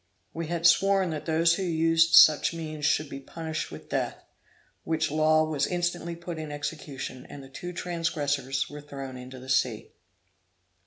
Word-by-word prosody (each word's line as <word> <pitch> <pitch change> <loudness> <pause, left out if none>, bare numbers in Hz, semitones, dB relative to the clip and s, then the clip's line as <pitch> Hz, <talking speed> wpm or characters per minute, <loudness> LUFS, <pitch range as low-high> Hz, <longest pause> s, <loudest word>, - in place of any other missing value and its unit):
We 165 -1 -4
had 170 0 -3
sworn 195 +1 +4
that 155 0 -5
those 165 +1 +3
who 180 - -2
used 165 -2 +3
such 155 +2 +7
means 155 -2 -3
should 155 0 +1
be 135 0 -7
punished 160 +3 -5
with - - -10
death; - - -2 0.6
which 160 -2 -1
law 155 +1 +4
was 150 -3 0
instantly 175 -1 -2
put 170 -1 -7
in 155 -1 -6
execution, 145 -3 -6
and 140 - -9
the 135 - -13
two 175 +6 -7
transgressors 145 -6 -2
were 150 0 -9
thrown 135 -2 -8
into 130 +1 -9
the 130 +1 -11
sea. 125 -4 0
155 Hz, 165 wpm, -27 LUFS, 140-165 Hz, 0.6 s, such